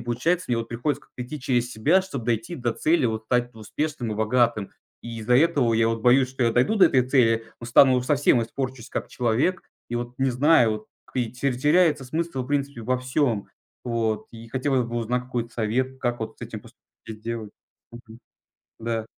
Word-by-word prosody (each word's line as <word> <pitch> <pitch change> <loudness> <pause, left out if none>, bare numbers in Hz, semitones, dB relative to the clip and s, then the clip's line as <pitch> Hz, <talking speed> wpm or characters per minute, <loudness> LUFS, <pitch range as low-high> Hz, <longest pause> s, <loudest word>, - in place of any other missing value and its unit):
получается, 160 +10 -1
мне 120 - +1
вот 115 0 -3
приходится 135 +4 -2
как-то 125 - -9
идти 150 +4 -7
через 125 -2 0
себя, 160 +13 +3
чтоб 140 -10 -6
дойти 115 +6 -1
до 120 -3 -1
цели, 160 +5 +1
вот 110 0 -3
стать 120 +1 0
успешным 120 +2 -3
и - - -3
богатым. 110 -1 +1 0.3
И 115 -1 -7
из-за 125 +3 +3
этого 140 -5 +3
я 115 0 +3
вот 115 0 -2
боюсь, 130 +1 +5
что 130 -1 -3
я 115 -1 +3
дойду 125 - +2
до 195 - +7
этой 125 -1 +2
цели, 115 -4 +3
но 115 - -7
стану 130 +1 +6
совсем, 140 -3 +3
испорчусь 125 +1 -5
как - - -4
человек. 125 +10 0 0.3
И 120 - -4
вот 120 +1 -4
не 135 -1 +2
знаю, 125 -2 +4
вот 110 0 -6 0.3
и 120 -3 -1
терь 125 0 -1
теряется 150 0 +3
смысл 155 0 -3
в - - -9
принципе 140 -3 -2
во 125 +3 0
всем. 130 -4 0 0.3
Вот. 115 -3 -1
И 115 0 -11
хотелось 130 -1 0
бы 120 0 -5
узнать 120 +2 -1
какой-то 120 -2 -3
совет, 130 +4 -1
как 120 -2 -1
вот 110 - -5
с - - -11
этим - - -7
посту - - -18 0.3
и - - -6
сделать. 110 0 -6 0.4
Мгм. 115 -1 -12 0.6
Да. 115 -1 -2
125 Hz, 200 wpm, -24 LUFS, 115-135 Hz, 0.6 s, до